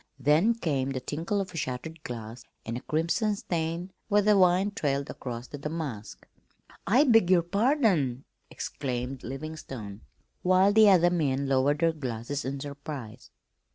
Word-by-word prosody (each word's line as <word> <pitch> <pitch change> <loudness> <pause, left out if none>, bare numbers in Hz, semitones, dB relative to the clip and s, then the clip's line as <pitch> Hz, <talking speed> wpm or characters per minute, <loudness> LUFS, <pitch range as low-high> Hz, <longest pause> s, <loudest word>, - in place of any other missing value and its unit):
Then 155 - +3
came 140 -11 -1
the 135 -1 -2
tinkle 165 +10 -2
of 190 -2 -3
shattered 150 +3 -4
glass 115 -1 -7 0.2
and 115 - -4
a 125 - -5
crimson 170 +7 0
stain 170 0 -3 0.2
where 205 -1 +3
the 210 0 +5
wine 185 +1 +4
trailed 140 -8 -1
across 120 -1 -6
the 145 - -8
damask. 145 -8 -6 0.6
"I 245 +10 +5
beg 225 - +4
your 180 -2 +5
pardon!" 195 - +1 0.3
exclaimed 130 -1 -4
Livingstone, 135 -6 -7 0.4
while 185 +2 +4
the 215 -1 +7
other 175 -2 +5
men 140 -5 0
lowered 135 +2 +2
their 165 -1 +3
glasses 135 -1 -4
in 135 +1 -3
surprise. 140 -4 -8
150 Hz, 145 wpm, -28 LUFS, 130-185 Hz, 0.6 s, the